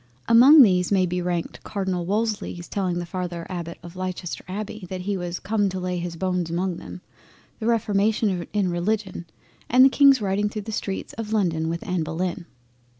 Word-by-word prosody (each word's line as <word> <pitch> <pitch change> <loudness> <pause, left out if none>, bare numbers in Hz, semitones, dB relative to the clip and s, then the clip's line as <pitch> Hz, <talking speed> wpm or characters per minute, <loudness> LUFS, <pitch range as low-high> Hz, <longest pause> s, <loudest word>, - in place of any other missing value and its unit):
Among 260 +6 +9
these 180 -4 +2
may 190 -2 +4
be 180 0 -2
ranked 175 -1 -3
Cardinal 190 -4 -3
Wolsey's 205 -4 -2
telling 185 -3 -2
the 175 - -3
father 175 -1 -5
Abbott 170 -2 -5
of 170 +1 -10
Leicester 185 -1 -5
Abbey 205 0 -6
that 185 -1 -4
"he 200 +2 -2
was 175 -1 -4
come 205 0 0
to 185 0 -4
lay 180 -1 -2
his 170 -1 -5
bones 180 -1 -1
among 175 +1 -1
them," 180 - -9 0.6
the 220 - -2
reformation 205 -4 +1
in 195 -3 0
Religion 185 0 -2 0.4
and 255 +2 +7
the - - +7
King's 275 -1 +6
riding 205 0 0
through 210 0 -5
the 220 - -6
streets 195 -2 -4
of 220 -1 -4
London 165 -6 +1
with 170 +1 -4
Anna 180 -3 0
Bullen. 170 +2 -3
185 Hz, 185 wpm, -24 LUFS, 175-210 Hz, 0.6 s, Among